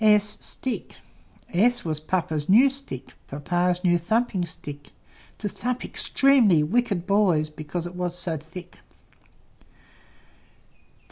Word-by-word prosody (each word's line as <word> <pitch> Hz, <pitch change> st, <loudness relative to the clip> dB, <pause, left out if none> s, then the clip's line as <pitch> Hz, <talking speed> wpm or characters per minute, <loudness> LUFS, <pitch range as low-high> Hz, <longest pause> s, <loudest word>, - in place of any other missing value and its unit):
S 210 Hz, -1 st, +2 dB, 1.0 s
S 240 Hz, +6 st, +3 dB
was 155 Hz, -2 st, -1 dB
Papa's 155 Hz, -2 st, -2 dB
new 240 Hz, +8 st, +7 dB
Stick, 260 Hz, -, -8 dB
Papa's 175 Hz, +5 st, 0 dB
new 175 Hz, -1 st, +4 dB
thumping 220 Hz, +1 st, 0 dB
Stick, 145 Hz, -2 st, -9 dB, 0.5 s
To 210 Hz, -, -3 dB
thump 245 Hz, +4 st, -3 dB
extremely 245 Hz, -, +4 dB
wicked 200 Hz, 0 st, 0 dB
boys, 185 Hz, -7 st, +2 dB
Because 155 Hz, +3 st, -5 dB
it 175 Hz, -, -6 dB
was 180 Hz, -1 st, -3 dB
so 175 Hz, -2 st, -3 dB
thick. 170 Hz, +4 st, -11 dB
180 Hz, 110 wpm, -25 LUFS, 160-215 Hz, 1.0 s, new